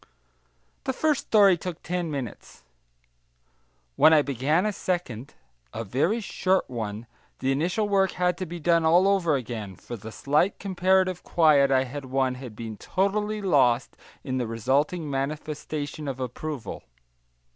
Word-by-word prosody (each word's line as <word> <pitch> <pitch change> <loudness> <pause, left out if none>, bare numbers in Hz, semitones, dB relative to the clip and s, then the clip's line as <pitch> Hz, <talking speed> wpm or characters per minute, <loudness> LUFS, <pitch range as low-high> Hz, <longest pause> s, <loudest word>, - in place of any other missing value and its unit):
The - - 0
first 305 -3 0
story 200 -4 +6
took 175 0 -7
ten 175 -1 -2
minutes. 135 -7 -7 1.3
When 160 - +6
I 150 -2 +5
began 140 - +1
a 210 - 0
second, 145 - -4 0.4
a 115 - -3
very 140 - 0
short 190 -3 0
one, 110 -3 -5 0.3
the 135 +1 0
initial 175 +10 0
work 195 -2 +2
had 180 -1 +1
to 185 - -3
be 175 +1 -6
done 170 +1 +3
all 175 +4 +5
over 185 -6 +2
again, 110 -6 -5
for 120 - -8
the 110 0 -9
slight 150 - +1
comparative 185 -1 +1
quiet 150 -5 +4
I 130 -1 +3
had 135 +2 -7
won 130 0 0
had 125 -4 -9
been 110 -1 -7
totally 210 - -1
lost 130 -9 +2 0.3
in 130 0 -2
the 120 - -2
resulting 140 - 0
manifestation 145 +1 -4
of 135 -1 -4
approval. 130 +1 -5
150 Hz, 145 wpm, -26 LUFS, 130-180 Hz, 1.3 s, story